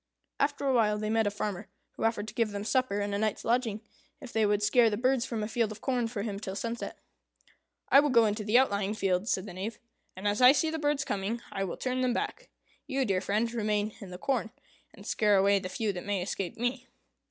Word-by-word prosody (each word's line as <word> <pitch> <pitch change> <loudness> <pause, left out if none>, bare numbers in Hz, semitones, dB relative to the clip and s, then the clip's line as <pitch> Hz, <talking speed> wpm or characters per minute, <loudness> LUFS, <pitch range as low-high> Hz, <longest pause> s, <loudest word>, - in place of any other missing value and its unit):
After 285 0 0
a 270 - +2
while 215 -3 +3
they 215 0 -2
met 225 -1 +2
with 205 - -1
a - - -16
farmer, 200 -1 -3 0.2
who - - -4
offered 220 -2 0
to - - -11
give 230 -1 +1
them 200 0 -4
supper 230 -3 +1
and 205 0 -2
a 200 - 0
night's 215 -1 -1
lodging, 230 -3 0 0.4
if 255 - -10
they 220 -1 +3
would 205 0 +1
scare 230 +2 +5
the 210 - -2
birds 255 +1 +1
from 225 -3 -3
a - - -2
field 225 -1 0
of 215 - -8
corn 250 -2 0
for 220 -3 -4
him 205 -3 -4
till 195 -2 -5
sunset. 230 +3 -4 0.9
"I 275 - +8
will 290 +1 +3
go 235 -3 +5
into 210 0 -1
the 215 +3 +4
outlying 205 -5 +2
fields," 195 +1 0
said 185 - 0
the 190 - -8
Knave, 200 +5 -5 0.4
"and 190 +2 -3
as 205 +3 0
I 250 +2 +9
see 315 +3 +1
the 320 - -3
birds 290 -2 0
coming, 205 +1 -2
I 195 - -2
will 180 - -5
turn 255 0 -1
them 250 -1 +2
back. - - -4 0.4
You, 270 -2 0
dear 190 -4 +1
friend, 215 +4 0
remain 210 -2 0
in 195 - -8
the 180 - -7
corn, 245 +1 -1 0.4
and - - -14
scare 210 -2 +3
away 200 +1 +4
the 185 -1 -6
few 210 +1 -1
that 180 - -6
may 200 -3 -1
escape 185 -1 -4
me." 245 +2 -2
215 Hz, 245 wpm, -29 LUFS, 205-245 Hz, 0.9 s, I